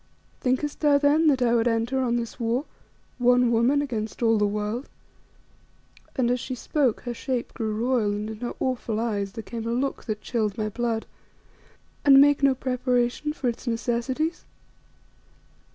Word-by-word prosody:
Thinkest 260 +3 -1
thou 295 -2 +4
then 295 +3 +3
that 265 -4 +3
I 235 -1 +3
would 235 0 +3
enter 230 +3 0
on 245 -2 +1
this 235 +1 -4
war 240 +4 0 0.5
one 245 0 +4
woman 250 +5 +3
against 225 -4 -4
all 225 -1 +4
the 210 - +3
world" 210 +5 -3 1.3
and 245 -2 +1
as 250 - +1
she 255 +1 -5
spoke 255 0 0
her 245 - -4
shape 250 0 -3
grew 220 -3 -2
royal 240 -5 +2
and 205 +1 -3
in 220 -1 -7
her 240 0 -4
awful 235 -4 -1
eyes 205 -4 -2
there 225 -1 -6
came 230 0 -6
a - - -1
look 260 +3 -2
that 215 -2 -3
chilled 215 -5 -1
my 215 -1 -1
blood 230 0 -2 1.0
"and 275 -1 +8
make 285 0 +5
no 275 -1 +4
preparation 250 +2 0
for 275 -4 -3
its 240 +2 -3
necessities? 245 +7 -1
240 Hz, 170 wpm, -25 LUFS, 225-265 Hz, 1.3 s, and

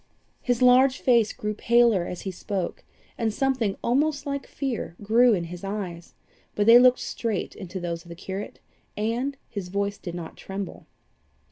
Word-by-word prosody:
His 245 0 +1
large 255 +1 +6
face 235 -4 +3
grew 210 0 -3
paler 235 -4 +3
as 180 - -6
he 190 - -4
spoke, 185 0 -4 0.4
and 225 -2 +1
something 250 -4 0
almost 285 +3 +1
like 280 -1 -3
fear 250 - -4
grew 230 +2 +5
in 175 - -2
his 175 +2 -8
eyes, 190 -4 -5 0.4
but 205 - +1
they 230 +2 +9
looked 255 0 +6
straight 220 -5 -3
into 190 -1 -7
those 170 -1 -4
of 170 - -16
the 170 - -8
curate, 190 +3 -6 0.4
and 240 +6 -1
his 200 -4 -6
voice 200 +1 -2
did 175 -1 -6
not 170 -2 -7
tremble. 195 -1 -7
210 Hz, 165 wpm, -25 LUFS, 190-245 Hz, 0.4 s, they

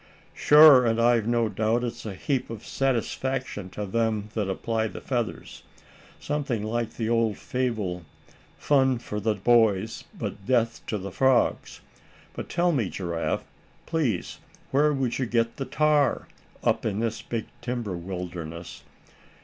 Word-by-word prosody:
"Sure, 150 -3 +8
and 115 -1 +1
I've 115 -2 +3
no 120 -1 +2
doubt 110 +3 0
it's 120 -1 -5
a 100 - -5
heap 135 +6 -2
of 115 -2 -8
satisfaction 130 -4 -2
to 105 +2 -5
them 110 0 -1
that 105 -3 -1
apply 110 +3 -1
the - - -8
feathers. 120 -4 -4 0.6
Something 140 -7 -2
like 115 +1 -2
the 115 - -2
old 115 -3 +1
fable 110 -9 -2 0.6
'fun 135 -3 +3
for 105 -2 -5
the 105 +1 0
boys, 110 -1 +2
but 100 - -6
death 115 -3 +1
to 105 - -1
the 100 0 -6
frogs.' 130 +4 +1 0.5
But - - -7
tell 175 0 +2
me, 120 - 0
Giraffe, 85 -3 -2 0.4
please 145 - -1 0.3
where 150 +3 +4
would 135 -4 -1
you 130 - 0
get 115 0 0
the 135 - -3
tar, 150 -1 +2 0.4
up - - +1
in 105 -2 -1
this 115 -1 -2
big 115 -1 -4 0.2
timber 120 -6 -3
wilderness? 85 -2 -6
115 Hz, 145 wpm, -26 LUFS, 105-130 Hz, 0.6 s, Sure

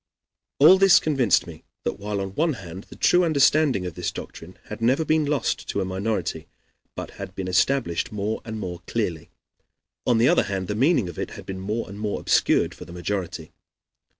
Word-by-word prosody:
All 170 +7 +7
this 195 -2 +7
convinced 135 - +2
me 80 -2 -11 0.2
that - - -3
while 100 0 -3
on 95 0 -5
one 160 +6 +1
hand 95 -3 -9
the - - -13
true 180 0 +4
understanding 145 - +3
of 90 - -4
this - - -3
doctrine 90 +3 -10
had 105 +1 -9
never 130 +7 +2
been 155 0 +2
lost 145 -1 -1
to - - -1
a 95 - 0
minority, 95 +4 -3 0.5
but - - -6
had - - -7
been 95 -1 -4
established 90 -1 +1
more 105 +1 -3
and 110 -1 -6
more 90 -3 -5
clearly, 90 -9 -2 0.8
on 120 - +4
the 115 +3 +4
other - - +4
hand 95 -2 -2
the 105 - -2
meaning 130 - +2
of 85 - -8
it - - -3
had - - -10
been 95 -1 -6
more 105 +5 -3
and 100 +2 -9
more 105 -1 -2
obscured - - +2
for - - -11
the 85 - -11
majority. 90 -3 -4
105 Hz, 200 wpm, -24 LUFS, 95-135 Hz, 0.8 s, All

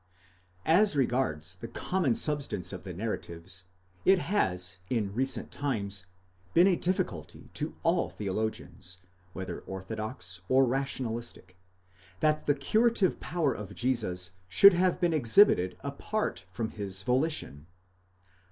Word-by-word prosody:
As 185 +2 +4
regards 120 - 0
the 115 - -7
common 140 +2 0
substance 140 - 0
of 90 - -6
the 95 - -6
narratives, 90 -2 -5 0.4
it 190 - +6
has 95 - -1
in 105 -5 -1
recent 130 +4 -1
times 100 -9 -2 0.5
been 175 - +7
a 190 -2 +4
difficulty 180 +2 -3
to - - -4
all - - +2
theologians, 100 -3 -4 0.4
whether 95 0 -5
orthodox 95 -2 -5
or 130 +1 +5
rationalistic, 120 -7 -3 0.6
that 155 +4 +1
the 145 - +4
curative 215 +6 +2
power 160 -5 0
of 100 -1 -8
Jesus 105 -9 0 0.2
should 200 - +8
have 180 0 +2
been 175 -2 +2
exhibited 120 - +5
apart 140 - -3
from 110 +4 -3
his 95 -2 -1
volition. 125 - 0
115 Hz, 120 wpm, -29 LUFS, 95-150 Hz, 0.6 s, should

